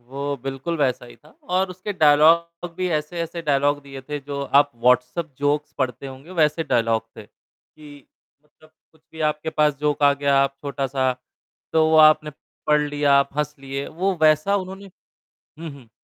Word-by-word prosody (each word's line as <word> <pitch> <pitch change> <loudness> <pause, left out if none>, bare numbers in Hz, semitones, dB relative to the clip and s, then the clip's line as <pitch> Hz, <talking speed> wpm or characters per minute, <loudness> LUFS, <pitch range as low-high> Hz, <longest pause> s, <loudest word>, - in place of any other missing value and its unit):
वो 140 +4 -5
बिल्कुल 135 +5 -4
वैसा 130 -3 0
ही 120 - -15
था 155 - -22 0.2
और 185 +1 +1
उसके 185 +3 -6
डायलॉग 170 +2 +3
भी 185 0 -1
ऐसे-ऐसे 165 +2 -6
डायलॉग 145 -1 +1
दिए 135 -1 -10
थे 145 +2 -5
जो 140 0 -6 0.2
आप 145 0 -1
व्हाट्सएप 125 +6 +1
जोक्स 145 +1 -1
पढ़ते 130 0 -3
होंगे 135 +5 -11
वैसे 155 +2 +2
डायलॉग 115 -4 +1
थे। 110 - -9
जी, 145 +5 -19 0.4
मतलब 155 +1 -24 0.2
कुछ 160 - -27
भी 160 - -11
आपके 150 +1 -6
पास 150 -1 +2
जोक 150 -1 0
का 145 -1 +5
गया 140 0 +1
आप 140 0 -1
छोटा-सा, 135 -2 -1 0.6
तो 160 0 +3
आपने 155 -1 +5 0.4
पढ़ 150 0 +4
लिया, 145 -1 +1
आप 140 0 +3
हँस 150 0 -1
लिए, 135 +1 -5
वो 185 +4 -1
वैसा 155 +6 +4
उन्होंने 190 +1 -7 0.7
हुँ, 165 0 -6
हुँ। 130 -5 -16
150 Hz, 170 wpm, -22 LUFS, 140-160 Hz, 0.7 s, का